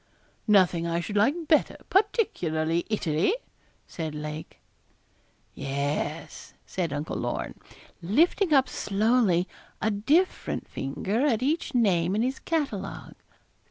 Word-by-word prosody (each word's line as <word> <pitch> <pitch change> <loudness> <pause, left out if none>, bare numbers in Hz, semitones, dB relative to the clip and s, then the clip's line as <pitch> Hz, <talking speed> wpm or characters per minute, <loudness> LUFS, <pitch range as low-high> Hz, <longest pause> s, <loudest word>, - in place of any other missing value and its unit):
'Nothing 180 -5 +4
I 170 0 0
should 205 +4 -5
like 290 +11 +2
better; 310 - +3
particularly 170 - +1
Italy,' 180 - +1 0.5
said 160 -3 -5
Lake. 150 +1 -6 0.9
'Yes,' 145 +3 -3
said 175 -5 -2
Uncle 145 +2 -3
Lorne, - - -3 0.5
lifting 320 - +2
up 270 -3 +5
slowly 205 -5 +2 0.3
a 220 - +1
different 290 - +1
finger 195 - -2
at 235 -3 +1
each 295 0 -1
name 190 -6 +3
in 220 - +2
his 260 +2 -1
catalogue. 275 - -3
200 Hz, 110 wpm, -27 LUFS, 165-270 Hz, 0.9 s, up